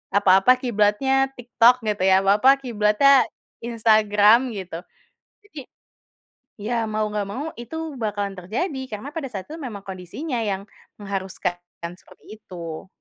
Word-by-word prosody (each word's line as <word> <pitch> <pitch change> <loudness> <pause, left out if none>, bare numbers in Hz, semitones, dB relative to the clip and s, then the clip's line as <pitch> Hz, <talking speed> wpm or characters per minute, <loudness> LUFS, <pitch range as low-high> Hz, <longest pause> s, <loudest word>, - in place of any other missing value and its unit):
Apa-apa 200 +5 +5
kiblatnya 255 +3 +1
TikTok 245 0 +3
gitu 210 -3 -1
ya, 190 0 +4
apa-apa 210 +8 +5
kiblatnya 240 +4 +4 0.3
Instagram 220 0 +3
gitu. 180 -4 -6 0.7
Jadi 315 - -9 1.0
iya 220 +4 -3
mau 215 0 -1
enggak 205 -1 -2
mau, 255 +9 -5 0.2
itu 240 +6 -8 0.2
bakalan 205 -2 -3
terjadi 265 - -3
karena 215 +7 -6
pada 295 -5 -3
saat 195 -6 -6
itu 325 - -7
memang 215 -8 -7
kondisinya 195 - -5
yang 200 -3 -2 0.3
mengharuskan 190 -3 -4 0.2
kan 170 +1 -5
seperti - - -20
itu. 170 -4 -8
210 Hz, 130 wpm, -23 LUFS, 195-250 Hz, 1.0 s, Apa-apa